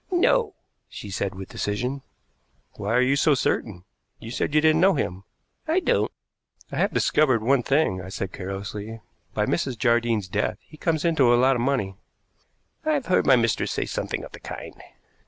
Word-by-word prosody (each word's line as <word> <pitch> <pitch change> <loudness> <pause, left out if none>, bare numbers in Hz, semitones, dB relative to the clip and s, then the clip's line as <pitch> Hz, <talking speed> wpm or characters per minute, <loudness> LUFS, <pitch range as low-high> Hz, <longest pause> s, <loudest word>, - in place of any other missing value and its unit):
"No," 425 +4 +2 0.3
she 100 - -8
said 95 +1 -2
with 95 0 -8
decision. 125 +7 -3 0.7
"Why 105 +3 -2
are 125 - +4
you 135 +2 +3
so 145 +1 +4
certain? 100 -7 -1 0.3
You 115 - -9
said 145 +4 -2
you - - +7
didn't 160 +1 +4
know 190 0 +5
him." 95 -8 -3 0.4
"I 325 +4 +3
don't." - - +1 0.6
"I - - -4
have - - +2
discovered 130 -7 +2
one 135 +2 +3
thing," 135 -8 +1
I 95 - -8
said 95 -1 -5
carelessly. 100 +3 -6 0.4
"By - - +1
Mrs. 130 -3 -1
Jardine's 115 -4 +1
death 105 +3 -1
he 155 - -16
comes 160 0 -1
into 145 -8 +4
a 120 - +5
lot 130 +2 +4
of 120 - -1
money." 120 -8 -1 0.9
"I've 305 -4 0
heard 185 - +2
my - - +7
mistress 115 -2 +1
say - - -1
something - - -3
of - - -9
the - - -11
kind." - - -8
125 Hz, 180 wpm, -25 LUFS, 105-155 Hz, 0.9 s, you